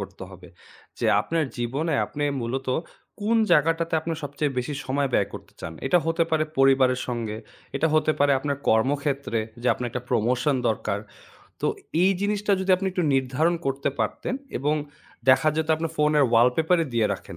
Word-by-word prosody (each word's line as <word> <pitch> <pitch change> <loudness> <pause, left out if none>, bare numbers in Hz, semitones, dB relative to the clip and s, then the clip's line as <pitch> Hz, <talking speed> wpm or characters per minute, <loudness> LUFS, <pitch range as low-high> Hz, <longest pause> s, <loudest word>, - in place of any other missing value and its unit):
করতে - - -8
হবে। - - -13 0.5
যে - - 0
আপনার 165 -1 -1
জীবনে 140 +7 -1
আপনি 145 - -5 0.2
মূলত 130 +3 -3 0.5
কোন 220 +3 +2 0.2
জায়গাটাতে 165 +2 +2
আপনি 165 +1 -4
সবচেয়ে 145 +1 -2
বেশি 125 +4 -3
সময় 140 +1 0
ব্যয় - - +2
করতে - - -10
চান। 80 - -6
এটা 180 - +4
হতে 165 +1 +2
পারে 155 -1 +2
পরিবারের 135 -1 +4
সঙ্গে, 115 -3 -3 0.4
এটা 160 - +2
হতে 155 0 +3
পারে 145 0 +4
আপনার 140 +1 -2
কর্মক্ষেত্রে 140 +1 +1 0.2
যে - - -2
আপনার 125 - -4
একটা 125 - -4
promotion 125 +5 +1
দরকার। 110 -2 -1 0.6
তো - - 0 0.4
এই 190 - +5
জিনিসটা 205 0 0
যদি 190 - -1
আপনি 190 +1 -3
একটু 180 - -1
নির্ধারণ 135 +6 +1
করতে 135 +1 0
পারতেন 255 - -2 0.2
এবং 150 +2 +1 0.5
দেখা 135 +4 +6
যেত 160 0 -1
আপনার 165 0 -3
ফোনের 150 -1 +3
wall 120 +2 +6
paper-ই 165 0 +2
দিয়ে 115 -2 +3
রাখেন - - -11
145 Hz, 170 wpm, -25 LUFS, 125-160 Hz, 0.6 s, দেখা